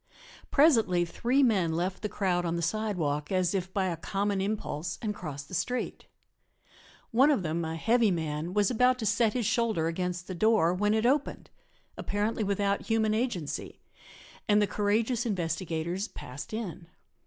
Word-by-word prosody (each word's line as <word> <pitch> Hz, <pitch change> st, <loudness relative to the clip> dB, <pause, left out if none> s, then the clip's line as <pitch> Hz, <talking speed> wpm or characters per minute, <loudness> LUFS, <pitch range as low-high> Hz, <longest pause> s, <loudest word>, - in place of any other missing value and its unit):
Presently 225 Hz, -, +4 dB
three 245 Hz, +10 st, +1 dB
men 190 Hz, -10 st, +2 dB
left 180 Hz, +3 st, -2 dB
the 210 Hz, -, -2 dB
crowd 180 Hz, -4 st, 0 dB
on 170 Hz, -1 st, -1 dB
the 170 Hz, -, -2 dB
sidewalk 170 Hz, -7 st, -1 dB
as 185 Hz, -1 st, +1 dB
if 190 Hz, -1 st, -2 dB
by 190 Hz, 0 st, 0 dB
a 180 Hz, -2 st, -1 dB
common 195 Hz, +4 st, -1 dB
impulse 185 Hz, -5 st, -3 dB
and 215 Hz, -2 st, -2 dB
crossed 145 Hz, -7 st, -7 dB
the -, -, -13 dB
street. 245 Hz, +8 st, -2 dB, 1.0 s
One 260 Hz, +6 st, +5 dB
of 275 Hz, -10 st, +2 dB
them, 165 Hz, +1 st, -1 dB
a 160 Hz, 0 st, -3 dB
heavy 230 Hz, +5 st, +3 dB
man, 160 Hz, 0 st, -2 dB
was 205 Hz, +2 st, +3 dB
about 250 Hz, +2 st, +3 dB
to 230 Hz, -, -4 dB
set 220 Hz, +1 st, +2 dB
his 245 Hz, -3 st, -1 dB
shoulder 220 Hz, -7 st, +1 dB
against 180 Hz, +1 st, -2 dB
the 185 Hz, -, -6 dB
door 195 Hz, -3 st, +3 dB
when 210 Hz, +3 st, +1 dB
it 220 Hz, +1 st, +1 dB
opened, 280 Hz, +3 st, 0 dB, 0.5 s
apparently 210 Hz, +2 st, -1 dB
without 200 Hz, 0 st, 0 dB
human 220 Hz, -1 st, +2 dB
agency, 215 Hz, -, -3 dB, 0.7 s
and 210 Hz, 0 st, +5 dB
the 210 Hz, -, +4 dB
courageous 220 Hz, +4 st, 0 dB
investigators 175 Hz, -2 st, -2 dB
passed 130 Hz, +3 st, -9 dB
in. 200 Hz, -7 st, -5 dB
200 Hz, 165 wpm, -29 LUFS, 170-220 Hz, 1.0 s, One